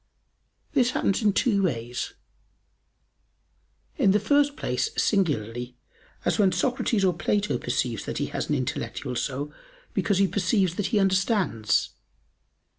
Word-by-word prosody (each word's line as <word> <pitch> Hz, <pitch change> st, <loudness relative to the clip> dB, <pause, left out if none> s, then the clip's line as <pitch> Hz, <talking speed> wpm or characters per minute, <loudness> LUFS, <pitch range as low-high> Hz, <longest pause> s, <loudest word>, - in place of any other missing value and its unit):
This 255 Hz, -4 st, +3 dB
happens 200 Hz, -5 st, 0 dB
in 210 Hz, -2 st, +4 dB
two 205 Hz, -1 st, +2 dB
ways: 125 Hz, -8 st, -2 dB, 1.8 s
In -, -, +4 dB
the 210 Hz, -, +4 dB
first 285 Hz, +6 st, +2 dB
place, -, -, -1 dB
singularly, 125 Hz, -, 0 dB, 0.5 s
as -, -, +1 dB
when 195 Hz, -2 st, +5 dB
Socrates 215 Hz, +1 st, +1 dB
or 185 Hz, -, +3 dB
Plato 195 Hz, -7 st, 0 dB
perceives 120 Hz, -2 st, -2 dB
that -, -, -4 dB
he -, -, 0 dB
has -, -, -3 dB
an 150 Hz, -, +2 dB
intellectual 140 Hz, -1 st, -3 dB
soul 140 Hz, +4 st, -3 dB, 0.4 s
because 200 Hz, -3 st, +1 dB
he 195 Hz, 0 st, +4 dB
perceives 190 Hz, -1 st, +1 dB
that 205 Hz, -, 0 dB
he 225 Hz, -, 0 dB
understands. 190 Hz, -, +1 dB
185 Hz, 130 wpm, -26 LUFS, 130-210 Hz, 1.8 s, when